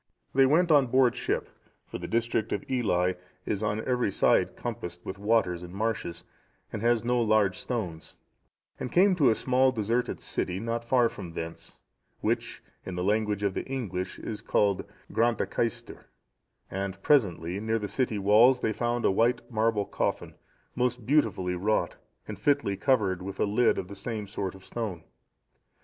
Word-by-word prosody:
They 135 0 +5
went 165 +4 +3
on 145 -4 +5
board 130 0 +3
ship, - - -2 0.4
for - - -7
the - - -5
district 115 -1 0
of 100 - -3
Ely 95 -8 +1 0.3
is 100 - -2
on 105 +1 -1
every 125 -5 +1
side - - +3
encompassed 85 0 -6
with 95 - -6
water 105 -3 +2
and 85 0 -8
marshes, 100 -6 -2 0.5
and 110 - -3
has 120 -1 +2
no 120 0 +1
large 105 -4 +2
stones, 90 -10 -5 0.6
and 125 - -4
came 190 +2 +5
to 150 -8 +4
a 110 - +3
small 130 +2 +3
deserted 115 +1 -1
city, 90 +1 -3
not 115 +2 -2
far 120 0 +3
from 85 -6 -8
thence, 80 0 -7 0.4
which, - - -2 0.2
in 95 - -6
the 90 - -2
language 105 0 0
of 100 -2 +1
the - - -3
English, 100 -9 -4
is 110 - -6
called 100 -2 +1 0.3
Grantacaestir,(666) 115 0 -1 0.7
and 95 0 -4
presently, 95 - +2
near 110 +1 0
the 105 -2 -3
city 110 +1 -1
walls, 110 +6 +5
they 110 - 0
found 120 +2 -1
a - - +4
white 120 +5 +2
marble 110 -2 +1
coffin,(667) - - -2 0.4
most 125 -2 -1
beautifully 105 -10 +2
wrought, 100 +5 0 0.3
and 105 -3 -7
fitly 140 -5 +1
covered 100 -5 +1
with 95 +1 -7
a - - +3
lid 110 +4 +2
of 90 - -3
the 100 - -9
same 105 +1 -4
sort 95 -2 -4
of 95 - -15
stone. 105 -9 -4
110 Hz, 165 wpm, -28 LUFS, 95-120 Hz, 0.7 s, They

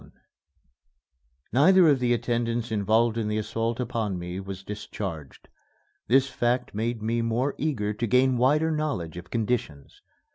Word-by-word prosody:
XXI - - -17 1.4
Neither 175 +7 +6
of 140 -4 +4
the 125 -1 +1
attendants 120 0 -1
involved 110 +2 +2
in 110 - -1
the 105 0 -1
assault 115 +2 -2
upon 115 -6 -2
me 90 +1 -5
was 95 -1 -7
discharged. 95 -7 -7 0.6
This 135 +2 +4
fact 125 -1 -1
made 110 +1 -2
me 115 +1 0
more 120 +5 0
eager 115 -9 -1
to 115 +3 -2
gain 125 +3 +3
wider 150 +6 +3
knowledge 145 - -2
of 90 0 -9
conditions. 110 - -3
115 Hz, 145 wpm, -26 LUFS, 105-125 Hz, 1.4 s, Neither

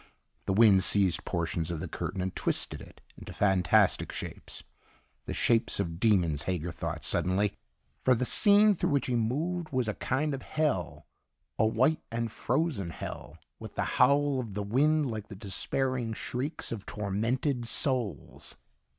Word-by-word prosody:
The - - 0
wind 100 -3 +6
seized 95 -4 +2
portions 85 -2 -2
of 85 -2 -3
the - - -5
curtain 95 - -4
and 95 0 -3
twisted - - -1
it - - -15 0.2
into - - -9
fantastic 95 -5 +2
shapes - - -8 0.6
the - - -3
shapes 115 -3 +3
of 85 -4 -3
demons, 90 -9 +2
Hager 90 -1 -2
thought 80 -2 -5
suddenly. 95 +4 +1 0.5
For 130 - +3
the 125 - -1
scene 205 +7 +5
through 185 - -1
which 140 -2 +1
he 125 - -1
moved 155 +9 -1
was 130 -4 -1
a 105 - -1
kind 145 +7 -1
of 135 - -5
hell, 145 - -2 0.5
a 110 - +4
white 130 +8 +2
and 115 -1 -2
frozen 130 - -1
hell, - - -8 0.2
with - - -10
the - - -1 0.2
howl 140 -1 +4
of 110 -6 -6
the 105 - -2
wind 145 +6 +2
like 110 -1 -6
the 105 - -10
despairing 115 +5 -2
shrieks 130 +7 -4
of 105 -4 -6
tormented 115 +5 -2
souls. 125 - -1
115 Hz, 160 wpm, -29 LUFS, 95-135 Hz, 0.6 s, wind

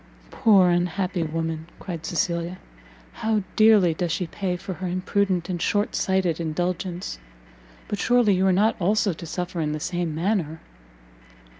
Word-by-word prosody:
"Poor 195 -5 +5
unhappy 180 +1 0
woman!" 160 0 -3
cried 170 -4 -6
Cecilia, 170 0 -1 0.6
"how 220 -2 0
dearly 215 -6 +6
does 170 +1 -2
she 170 +3 -1
pay 180 +1 -3
for 190 +1 -6
her 185 +1 -5
imprudent 185 0 0
and 175 -2 -3
short 205 +4 +1
sighted 190 -4 +1
indulgence! 175 - -3 0.7
but 205 - -3
surely 240 -4 +4
you 190 +1 +2
are - - +4
not 210 +5 +3
also 200 +1 +2
to 170 - -9
suffer 180 0 -3
in 150 -1 -1
the 155 - -3
same 175 -1 -2
manner?" 165 -3 -1
180 Hz, 150 wpm, -24 LUFS, 170-195 Hz, 0.7 s, dearly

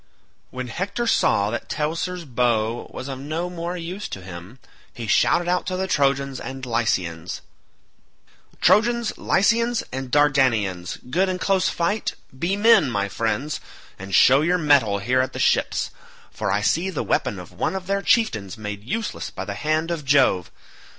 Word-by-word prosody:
When 130 0 -5
Hector 200 - -2
saw 105 - +2
that 120 - -5
Teucer's 165 +3 -2
bow 120 -3 0
was 130 - -7
of 135 -1 -5
no 160 +6 -3
more 175 +1 -4
use 180 +4 -5
to 95 - -7
him, 90 +6 -10 0.4
he 120 -3 -5
shouted 170 - +3
out 180 +1 0
to 185 - -2
the 190 - -1
Trojans 140 -5 +1
and 130 0 -6
Lycians, 95 -9 -1 1.2
"Trojans, 235 +2 +3
Lycians, 230 +4 +2
and 130 0 -4
Dardanians 120 -11 +2
good 185 +5 +2
in 185 - -1
close 190 0 +1
fight, 200 +5 -1 0.2
be 170 +8 -1
men, 220 - +5
my 100 -4 -1
friends, 115 +8 -2 0.4
and 95 0 -3
show 135 +2 +6
your 175 +4 +2
mettle 140 - +3
here 125 +6 +1
at 130 - -3
the - - -6
ships, - - +1 0.4
for - - -2
I 100 +2 +1
see 170 - +1
the 175 - -3
weapon - - 0
of - - -10
one - - -2
of 190 -1 -4
their 195 +1 0
chieftains 110 - +1
made 105 -1 -6
useless 220 - -3
by - - -6
the - - -4
hand 155 +2 -1
of 165 -3 -3
Jove. 135 -10 +3
140 Hz, 165 wpm, -23 LUFS, 115-180 Hz, 1.2 s, show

